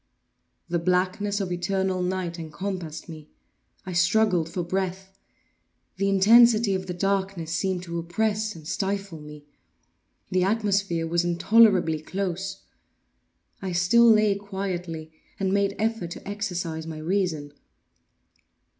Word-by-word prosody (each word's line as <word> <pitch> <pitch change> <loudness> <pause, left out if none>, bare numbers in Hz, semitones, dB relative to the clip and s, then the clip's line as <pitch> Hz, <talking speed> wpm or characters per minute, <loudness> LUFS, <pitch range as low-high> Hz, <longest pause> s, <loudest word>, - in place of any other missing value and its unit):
The 170 0 0
blackness 185 +4 0
of 190 -3 -3
eternal 190 +1 -1
night 180 -2 -2
encompassed 165 0 -5
me. 155 -2 -10 0.6
I 185 - -5
struggled 175 -1 +2
for 175 +1 -3
breath. 190 +1 -3 0.8
The 195 +1 +1
intensity 220 +2 +6
of 190 0 -3
the 180 - -3
darkness 190 -3 -1
seemed 185 0 -1
to 170 -1 -4
oppress 215 +5 -1
and 155 -2 -11
stifle 195 -2 -3
me. 150 -1 -11 0.9
The 185 0 +2
atmosphere 200 -4 +1
was 170 +1 +1
intolerably 175 -2 +4
close. 190 +2 -4 1.0
I 190 -2 -3
still 230 +7 +5
lay 215 -2 +5
quietly, 185 -5 -5 0.3
and 190 -1 0
made 200 0 +1
effort 220 -5 -1
to 175 - -9
exercise 180 -6 -3
my 160 -1 -6
reason. 160 -3 -1
185 Hz, 120 wpm, -25 LUFS, 170-200 Hz, 1.0 s, intensity